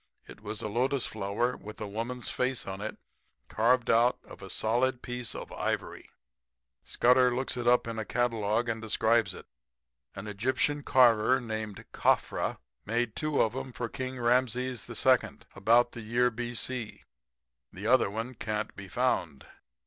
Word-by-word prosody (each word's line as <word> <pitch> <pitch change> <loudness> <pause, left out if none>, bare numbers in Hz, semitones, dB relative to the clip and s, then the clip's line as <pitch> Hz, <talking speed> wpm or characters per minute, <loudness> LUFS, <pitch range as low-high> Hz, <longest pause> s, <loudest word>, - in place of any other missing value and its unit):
It - - -12
was 105 0 -5
a - - -1
lotus 125 +4 +1
flower 110 +4 -1
with 105 +1 -10
a 110 - -4
woman's 115 +4 -3
face 125 0 -1
in 95 +1 -6
it 110 - -5 0.5
carved 120 +2 +2
out 120 +2 +4
of - - -13
a 95 - -9
solid 120 +5 +1
piece 125 -2 -3
of - - -7
ivory. - - -3 0.7
"Scudder 125 0 +4
looks 130 0 -1
it 120 -1 -3
up 125 -1 +4
in 115 -1 -4
a - - -1
catalogue 115 -1 0
and 115 -1 -2
describes 110 -2 +2
it. - - -11 0.7
An 95 - -7
Egyptian 130 +8 0
carver 125 -3 +4
named 110 -3 -5
Khafra - - +1 0.3
made 115 0 -1
two 155 -1 -1
of 110 +2 -2
'em 130 0 -5
for 120 - -3
King 130 0 -5
Rameses 125 0 0
II. - - +4 0.4
about 115 +5 +4
the 115 - -8
year 120 +3 +2
B.C. 120 0 -3 0.7
The - - -9
other - - +4
one 115 +5 -4
can't 110 -3 -3
be 100 -1 -9
found. 70 -5 -1
120 Hz, 155 wpm, -29 LUFS, 110-125 Hz, 0.7 s, out